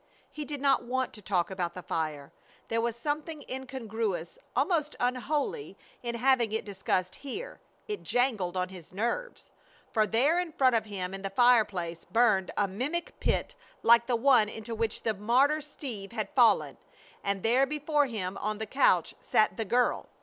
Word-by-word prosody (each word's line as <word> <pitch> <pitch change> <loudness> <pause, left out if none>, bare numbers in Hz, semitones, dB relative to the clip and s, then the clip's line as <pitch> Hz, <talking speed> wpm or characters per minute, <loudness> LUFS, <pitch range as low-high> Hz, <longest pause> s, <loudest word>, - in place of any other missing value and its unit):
He 300 - -6
did 290 -2 -5
not 275 -2 +3
want 255 +2 -2
to 210 - -10
talk 185 -2 0
about 175 -2 -3
the 180 - -7
fire. 150 -3 -3 0.4
There 230 0 +1
was 235 -1 -1
something 295 +4 -3
incongruous, 225 -9 -4 0.2
almost 300 +2 +1
unholy, 250 - -1 0.2
in 235 -1 -3
having 245 -2 +3
it 220 - -2
discussed 190 -2 -1
here. 405 - -7 0.3
It 420 -1 -4
jangled 220 -8 0
on 180 0 -1
his 180 -4 -12
nerves. 240 - -3 0.4
For 215 -2 +2
there 270 - +3
in 350 -3 -3
front 260 -3 +4
of 220 -1 +1
him 190 -3 -4
in 195 - -6
the 195 - -3
fireplace 195 -7 +3
burned 215 -5 +3
a 205 - +2
mimic 265 - -3
pit - - 0 0.3
like 235 0 +6
the 250 - +2
one 235 -3 +4
into 220 +1 -7
which 225 -1 -2
the 220 - +1
martyr 255 +9 +3
Steve 240 -8 -7
had 215 -4 -2
fallen; 240 -4 +4 0.5
and 200 -1 -1
there 250 +4 +4
before 295 0 +1
him 200 -5 -4
on 215 +1 -2
the 220 - -3
couch 205 - +3
sat 215 - +2
the 225 - -2
girl! 245 +4 +1
230 Hz, 170 wpm, -29 LUFS, 195-270 Hz, 0.5 s, like